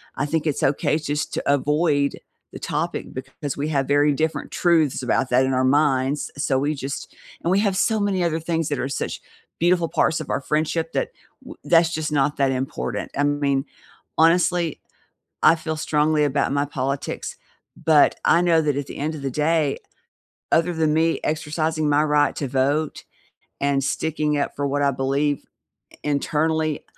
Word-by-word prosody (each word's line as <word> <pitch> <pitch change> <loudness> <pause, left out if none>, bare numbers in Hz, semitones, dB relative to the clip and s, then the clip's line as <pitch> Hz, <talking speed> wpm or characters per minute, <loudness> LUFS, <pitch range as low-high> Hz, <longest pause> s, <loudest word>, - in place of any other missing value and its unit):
I 140 - -1
think 160 +1 -1
it's 145 - -1
okay 145 +2 +2
just 150 -1 -3
to - - -2
avoid 145 0 +1 0.3
the - - -7
topic - - -3
because 145 -3 -6
we 145 +2 -2
have 140 -3 0
very 145 +1 +3
different 155 +3 -2
truths 160 -6 +2
about 130 +1 +1
that 130 +2 +4
in 130 - 0
our 130 0 +2
minds, 140 0 +1
so 135 -3 +1
we 150 +2 0
just 140 0 -6 0.3
and 170 - +1
we 195 - +4
have 200 -3 +1
so 220 +2 +2
many 195 -3 0
other 165 -1 0
things 165 -1 -1
that 145 -3 -2
are 130 - -2
such 140 - -4 0.4
beautiful 170 0 +3
parts 160 - +1
of 150 - -8
our - - -1
friendship 160 +3 -1
that - - -1 0.3
w - - -10
that's 165 -1 +4
just 155 -1 -2
not 145 0 +1
that 135 -1 +2
important, 125 -4 -3
I 145 - +2
mean, 140 -1 0 0.5
honestly, 170 0 +3 0.6
I 165 - +6
feel 160 -1 -4
strongly 150 0 +1
about 140 -1 0
my 140 0 +1
politics, 135 0 -3 0.5
but 155 -2 +5
I 170 - +5
know 165 -2 +3
that 145 -2 0
at 140 -1 -3
the - - -8
end 155 +3 -2
of 140 - -8
the 135 - -2 0.2
day, 155 -4 +1 0.7
other 170 +2 +3
than 155 -1 +1
me 165 +1 +2
exercising 155 0 -1
my 145 +1 +3
right 150 -2 +2
to 140 - -3
vote 140 +4 0 0.6
and 140 -1 +1
sticking 150 +1 -1
up 145 - -2
for 145 - -2
what 145 +1 -1
I 140 - +4
believe 140 +2 0 0.5
i - - -17
internally, 155 +1 0
150 Hz, 180 wpm, -23 LUFS, 140-160 Hz, 0.7 s, I